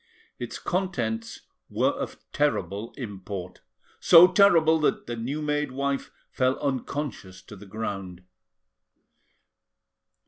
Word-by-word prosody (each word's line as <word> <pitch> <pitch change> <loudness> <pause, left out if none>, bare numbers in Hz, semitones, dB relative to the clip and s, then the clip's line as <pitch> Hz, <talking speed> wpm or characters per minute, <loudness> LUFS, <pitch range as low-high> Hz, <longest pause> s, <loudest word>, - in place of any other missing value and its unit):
Its - - -5
contents 120 -12 -3 0.3
were - - +1
of - - -6 0.2
terrible 105 +4 -1
import, 100 -6 -7 0.4
so 170 0 +9
terrible 170 -5 +5
that 150 - 0
the 120 - -4
new 135 +7 -4
made 150 -2 -1
wife 140 +1 -2 0.2
fell 130 0 +1
unconscious 130 -8 -4
to 105 - -13
the 100 +1 -13
ground. 95 -4 -5
130 Hz, 105 wpm, -26 LUFS, 105-150 Hz, 0.4 s, so